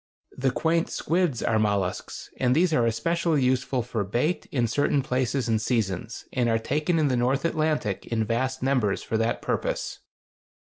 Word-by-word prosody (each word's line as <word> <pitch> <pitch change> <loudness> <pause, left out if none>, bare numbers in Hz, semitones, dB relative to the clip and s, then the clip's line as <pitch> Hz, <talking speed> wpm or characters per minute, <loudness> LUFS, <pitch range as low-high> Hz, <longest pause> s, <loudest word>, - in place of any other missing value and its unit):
The 135 0 +1
quaint 165 +5 +1
squids 165 -7 0
are 110 -1 +2
mollusks, 100 -4 -2
and 125 0 +3
these 170 +1 +3
are 120 -5 +3
especially 155 +6 +1
useful 130 0 +1
for 115 -3 -2
bait 120 - -1
in 120 -4 +1
certain 140 +3 +1
places 130 -1 0
and 110 -1 +1
seasons, 110 -1 -2
and 125 -2 +1
are 115 - +3
taken 150 +9 0
in 155 -2 +3
the 130 - +1
North 130 +5 +1
Atlantic 155 - 0
in 115 -1 0
vast 130 +4 -1
numbers 125 -7 +1
for 110 - -1
that 115 +1 -1
purpose. - - -2
125 Hz, 170 wpm, -26 LUFS, 115-150 Hz, -, and